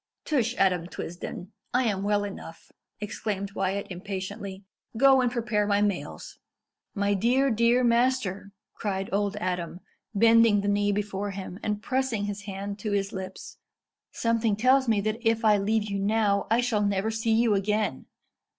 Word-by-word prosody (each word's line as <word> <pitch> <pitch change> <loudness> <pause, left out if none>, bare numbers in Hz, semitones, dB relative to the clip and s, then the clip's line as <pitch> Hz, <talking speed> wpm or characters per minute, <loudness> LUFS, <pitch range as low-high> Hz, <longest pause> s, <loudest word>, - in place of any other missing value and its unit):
"Tush, 250 -5 0
Adam 180 -3 +2
Twisden! 180 +2 -7 0.2
I 255 - +4
am 205 -5 0
well 205 0 +1
enough," 190 -5 -9 0.3
exclaimed 205 -1 -4
Wyat 195 0 -2
impatiently. 195 +1 -6 0.3
"Go 265 +1 +6
and 245 -1 +1
prepare 220 -4 0
my 200 -1 +2
mails." 200 -3 -4 0.6
"My 200 0 +1
dear, 250 +7 +2
dear 235 +3 +3
master," 235 -5 +1 0.2
cried 195 -2 -3
old 205 0 0
Adam, 180 -3 -3 0.4
bending 225 -1 +5
the 200 - -3
knee 205 0 +2
before 205 0 -2
him, 190 -1 -7
and 210 0 -2
pressing 255 -5 -1
his 205 0 -5
hand 200 +1 -5
to 210 0 -3
his 200 +1 -1
lips; 190 -1 -7 0.5
"something 230 -2 +1
tells 260 +4 +3
me 220 -3 +2
that 215 +2 -2
if 225 -1 +1
I 210 -1 +5
leave 215 +2 +1
you 200 -1 -3
now 200 0 +1
I 230 +2 +3
shall 235 -4 0
never 200 +1 0
see 225 0 0
you 225 -1 +3
again. 205 -5 -1
205 Hz, 160 wpm, -27 LUFS, 195-230 Hz, 0.6 s, Go